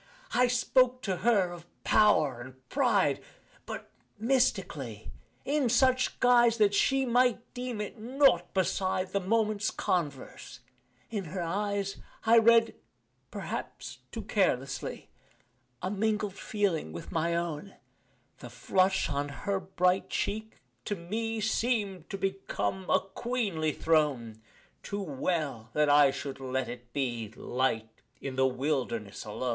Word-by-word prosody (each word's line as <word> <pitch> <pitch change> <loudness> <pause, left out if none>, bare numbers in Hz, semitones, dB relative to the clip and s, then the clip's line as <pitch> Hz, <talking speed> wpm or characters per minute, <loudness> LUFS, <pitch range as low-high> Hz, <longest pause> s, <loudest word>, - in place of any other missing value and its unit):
I 250 0 +4
spoke 255 +1 +2
to 190 -3 -1
her 195 -2 +2
of 175 -1 -10 0.2
power 155 - +4
and 130 +1 -13
pride, 215 - +2 0.5
But - - -7 0.3
mystically 190 - 0 0.3
in 285 -3 +1
such 255 +1 +3
guise 240 -2 +5
That 210 -2 +4
she 270 +6 +3
might 245 -1 +2
deem 250 -3 -4
it 210 +2 -5
nought 245 -7 +3
beside 185 0 0
The 200 - +1
moment's 215 +1 +1
converse; 145 -6 -3 0.5
in 205 -4 -3
her 175 +3 -4
eyes 200 +2 -2 0.3
I 230 +1 +7
read, 230 0 +5 0.6
perhaps - - -6
too 225 -2 -5
carelessly 155 - -1 0.7
A 185 - -1
mingled 210 -1 0
feeling 195 - -1
with 85 - -8
my 170 0 0
own 170 +2 -3 0.6
The - - -9
flush 190 +1 +1
on 145 0 -2
her 195 +7 -2
bright 185 0 +1
cheek, 220 +1 -3 0.3
to 205 - -1
me 220 +6 -3
Seem'd 210 -5 -1
to 195 - -4
become 195 -1 -2
a - - +4
queenly 195 -6 -2
throne 140 -9 0 0.4
Too 205 0 -4
well 140 - -2
that 150 -1 +3
I 145 -1 +7
should 135 0 -5
let 130 0 -2
it 120 0 -9
be 120 -5 -2
Light 115 -4 -2 0.2
in 135 -2 -5
the 130 0 +3
wilderness 125 -7 -2
alone. 110 +4 -3
190 Hz, 130 wpm, -29 LUFS, 145-220 Hz, 0.7 s, I